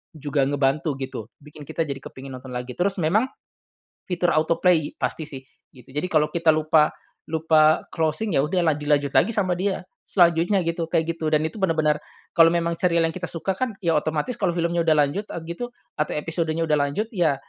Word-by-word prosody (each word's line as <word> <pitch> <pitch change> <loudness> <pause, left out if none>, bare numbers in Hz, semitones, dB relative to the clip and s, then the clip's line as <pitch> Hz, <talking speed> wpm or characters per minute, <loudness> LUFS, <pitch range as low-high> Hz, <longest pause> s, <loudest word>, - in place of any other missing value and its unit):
juga 145 -2 0
ngebantu 140 +1 0
gitu 130 -5 -6 0.2
bikin 150 0 -12
kita 165 - -1
jadi 140 -2 -5
kepingin 130 0 -10
nonton 130 0 -11
lagi. 125 +1 -4
Terus 190 +2 +1
memang, 210 +11 +2 0.8
fitur 175 -1 +1
autoplay 165 0 +2
pasti 160 - -2
sih 135 -2 -8 0.3
gitu. 125 0 -17
Jadi 150 +5 -1
kalau 150 -1 +2
kita 170 -1 -1
lupa 155 0 +3 0.4
lupa 155 -1 +3
closing 160 +4 0
ya - - +4
udah 180 +4 0
la - - -1
dilanjut 145 -1 +1
lagi 225 - +4
sama 185 -4 +1
dia 190 0 -1 0.3
selanjutnya 175 +1 +3
gitu 165 0 -1
kayak 165 0 +1
gitu 160 - -4
dan 155 0 +3
itu 160 +7 -4
benar-benar, 155 -4 +2 0.4
kalau 165 -2 +7
memang 170 0 0
serial 170 -2 +2
yang - - -1
kita 180 -1 -4
suka 175 +3 -2
kan 250 -5 -1
ya 165 -2 +2
otomatis 155 +10 -2
kalau 190 -4 +1
filmnya 170 0 0
udah 155 - +5
lanjut 200 +9 -4
at 170 - -5
gitu 240 +9 -5 0.3
atau 150 - 0
episodenya 165 +1 -1
udah 150 -1 +2
lanjut 145 +10 -1
ya, 170 - +2
160 Hz, 190 wpm, -24 LUFS, 150-175 Hz, 0.8 s, kalau